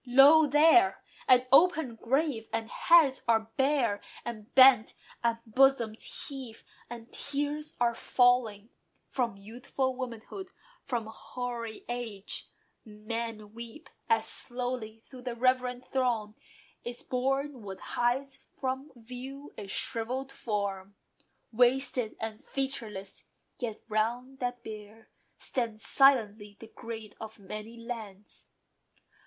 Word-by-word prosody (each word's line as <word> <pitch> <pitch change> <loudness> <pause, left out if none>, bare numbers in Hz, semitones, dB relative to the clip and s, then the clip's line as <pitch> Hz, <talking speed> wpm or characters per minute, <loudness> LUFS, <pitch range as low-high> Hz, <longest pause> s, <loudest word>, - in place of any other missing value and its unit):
Lo! 275 +5 +7
there, 325 +6 +5 0.3
an 255 0 +6
open 315 -4 +5
grave! 250 0 -1
and 225 0 -3
heads 315 -6 +5
are 225 -1 +2
bare, 265 -7 +2 0.2
And 225 0 -7
bent; 260 -4 +7 0.3
and 235 -1 +2
bosoms 235 -2 +2
heave, 260 -5 -8 0.3
and 235 -1 -9
tears 290 +2 -2
are 240 -1 +3
falling 235 -4 +2 0.4
From 235 -6 -1
youthful 250 +5 -3
womanhood, 255 - -7 0.3
from 235 -3 -2
hoary 235 0 -6
age. 230 -5 -4 0.4
Men 215 0 -6
weep, 235 +7 -10 0.2
as 450 - +3
slowly 245 -3 -2
through 255 -2 -12
the 245 -1 -4
reverent 255 0 +1
throng 235 -5 0 0.5
Is 240 0 -5
borne 270 +1 -1
what 195 -2 -7
hides 265 +3 -1 0.2
from 265 +2 -3
view 255 +4 -9
a 205 - -7
shrivelled 250 +7 -2
form, 200 -4 -3 0.6
Wasted 250 0 +2
and 220 -1 -5
featureless: 225 -8 -3 0.3
yet 230 -4 -4
round 240 +5 -1
that 245 -1 -3
bier 215 0 -10 0.3
Stand 230 -4 -2
silently 220 -5 +3
the 225 - -11
great 225 -3 -7
of 220 0 -8
many 215 +3 -8
lands. 220 -4 -8
240 Hz, 115 wpm, -30 LUFS, 220-265 Hz, 0.6 s, Lo